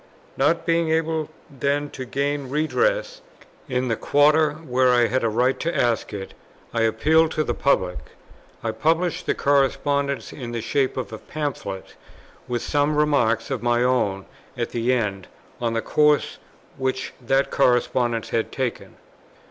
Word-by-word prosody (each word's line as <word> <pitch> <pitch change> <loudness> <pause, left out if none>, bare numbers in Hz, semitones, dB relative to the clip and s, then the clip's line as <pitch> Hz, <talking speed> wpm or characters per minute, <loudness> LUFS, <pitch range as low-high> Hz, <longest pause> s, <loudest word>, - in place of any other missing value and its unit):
Not 165 +2 +1
being 165 -1 +2
able 160 -1 0 0.2
then 140 +1 -1
to 130 - -6
gain 140 +1 -2
redress - - 0 0.5
in 125 0 0
the 115 - +1
quarter, 150 +4 +3
where 130 -5 +1
I 120 -1 +4
had 130 +2 0
a 115 - +2
right 125 +4 +1
to 170 +1 -2
ask 120 -2 +1
it, 95 -1 -6 0.4
I 115 - 0
appealed 155 +9 +3
to 155 - +1
the - - -1
public. 95 -10 +1 0.6
I 115 - 0
published 160 +9 0
the - - +1
correspondence 140 0 +1
in 120 -4 -7
the 115 - -2
shape 135 +3 0
of 115 -4 -4
a 110 - -6
Pamphlet, 140 -11 -5 0.5
with 120 -1 -2
some 145 +1 +1
remarks 140 -6 +2
of 130 - -2
my 120 0 +2
own 105 -6 +1 0.3
at 120 -1 -2
the 120 +1 0
end, 105 -6 -1 0.3
on 115 -1 0
the 115 - -1
course 150 -1 +2 0.4
which 130 0 -2
that 135 +3 +1
correspondence 120 -2 +1
had 115 - -1
taken. 130 -3 -4
130 Hz, 155 wpm, -23 LUFS, 120-150 Hz, 0.6 s, I